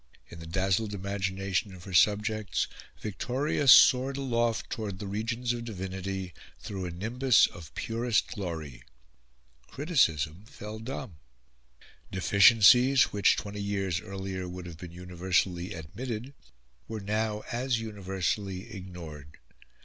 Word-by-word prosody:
In 85 - -10
the 80 - -9
dazzled 95 +4 0
imagination 95 0 -2
of 90 - -13
her 95 - -9
subjects 105 +3 +2 0.4
Victoria 130 +7 -1
soared 130 +1 +7
aloft 120 -3 0
towards 105 -4 -4
the 100 - -6
regions 115 +4 -2
of 120 -1 -5
divinity 95 -3 -5 0.3
through 95 -3 -5
a - - -3
nimbus 115 +8 +3
of 80 -4 -9
purest 115 0 0
glory. 80 - -6 0.9
Criticism 95 - +1
fell 110 -4 -8
dumb; 115 - -6 0.9
deficiencies 115 +7 +6
which, 100 -2 +4
twenty 100 0 -5
years 95 -3 -1
earlier, 95 -1 -5
would 90 0 -7
have 85 -2 -9
been 90 -1 -8
universally 90 +1 -1
admitted, 115 - -6 0.5
were 110 -1 -5
now 105 +1 -1
as 120 0 0
universally 100 -1 -3
ignored. 85 -6 -9
100 Hz, 120 wpm, -29 LUFS, 90-115 Hz, 0.9 s, soared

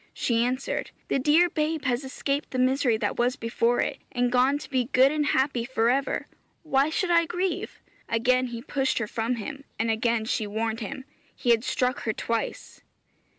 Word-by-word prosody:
She 235 -1 +1
answered, 255 +2 -2 0.2
'The - - +1
dear 310 +6 +5
babe 310 -2 -2
has 250 +1 0
escaped 275 +2 -2
the 255 - -4
misery 255 -2 +2
that - - -2
was 245 +2 +2
before 235 -1 +1
it, - - -2
and 245 -1 0
gone 255 +3 +3
to 290 - -9
be 255 -3 0
good 260 +2 +4
and 300 -1 0
happy 265 -3 +1
for 240 -1 +1
ever. 275 +1 -1 0.4
Why 280 -1 +2
should 350 +3 0
I 335 -1 +4
grieve?' 360 +2 -2 0.3
Again 255 +2 +2
he 235 -1 -7
pushed 270 -1 0
her 235 - 0
from 225 +3 -2
him, 260 +5 -6
and 225 0 +1
again 225 0 0
she 220 -2 -1
warned 220 +2 -2
him; 235 +4 -6 0.3
he 240 - +1
had 230 -1 +3
struck 255 0 0
her 220 - -2
twice. 230 +2 -4
255 Hz, 190 wpm, -26 LUFS, 230-275 Hz, 0.4 s, dear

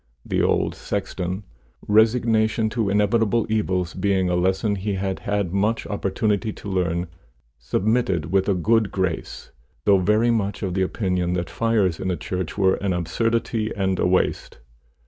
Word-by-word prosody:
The - - 0
old - - +1
sexton, 90 +2 -4 0.4
resignation 110 0 +3
to 110 -3 0
inevitable 105 +2 +2
evils 95 -5 0
being 95 -1 +1
a - - +1
lesson 95 +4 +1
he 100 +1 -2
had 95 0 -2
had 100 -3 -2
much 105 +4 0
opportunity 105 +1 -1
to - - -10
learn, 90 -3 0 0.5
submitted 95 - 0
with 95 +1 +2
a 100 - +3
good 110 +4 +2
grace, 95 -4 -3 0.3
though 100 -2 +5
very 105 +5 +3
much 105 -3 -1
of 95 -2 -2
opinion 90 -2 0
that 90 -1 -3
fires 110 -7 +1
in 95 - -2
a 90 - -1
church 90 +2 -4
were 95 -2 +3
an 100 -2 -1
absurdity 110 +6 -1
and 95 -2 0
a - - +2
waste. 90 +1 0
100 Hz, 150 wpm, -23 LUFS, 90-110 Hz, 0.5 s, though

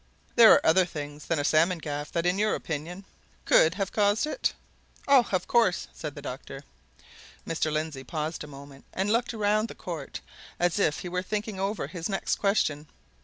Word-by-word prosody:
"There 230 -2 +9
are - - +5
other 175 +4 +5
things 150 -3 -7
than 165 - +1
a 145 - 0
salmon 165 +5 +3
gaff 145 -2 -5
that, 170 0 0
in 180 +2 +1
your 215 0 +2
opinion, 170 +5 -5 0.4
could 165 +2 +5
have 195 -1 -2
caused 205 +4 +2
it?" 310 +11 -1 0.6
"Oh, 275 -4 +6
of 185 - 0
course!" 210 -7 +2
said 150 -3 -7
the 145 - -9
doctor. 135 +1 -7 0.8
Mr. 160 -1 -1
Lindsey 155 -3 -3
paused 155 +4 -4
a - - -9
moment, 140 -1 -12
and 195 +2 0
looked 240 +1 +1
round 215 0 +1
the - - -10
court 165 -6 -6 0.4
as 175 +3 +1
if 155 -7 +1
he 180 - -5
were 180 +1 -1
thinking 210 +1 -4
over 200 +2 -1
his 175 +1 -5
next 195 - -1
question. 155 -7 0
175 Hz, 185 wpm, -27 LUFS, 150-205 Hz, 0.8 s, There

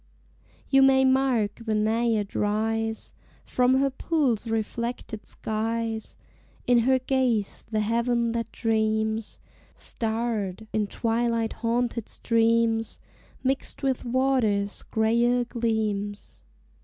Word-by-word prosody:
You 270 0 +5
may 265 0 +5
mark 260 -5 +1
the 220 -1 -1
naiad 220 -1 +1
rise 220 +1 -1 0.3
From 250 +1 +2
her 275 +1 +2
pool's 260 -6 0
reflected 225 0 -3
skies; 225 0 -3 0.5
In 245 -1 +4
her 260 +3 +3
gaze 255 -5 0
the 215 -1 0
heaven 235 +2 +1
that 230 -1 -3
dreams, 220 -1 0 0.4
Starred, 220 -3 -3
in 210 -1 +1
twilight 230 +1 0
haunted 235 -1 -1
streams, 230 -1 +1 0.4
Mixed 265 +1 -2
with 265 -2 0
water's 240 -5 +1
grayer 235 +2 +2
gleams. 215 -4 -2
230 Hz, 100 wpm, -26 LUFS, 220-245 Hz, 0.5 s, You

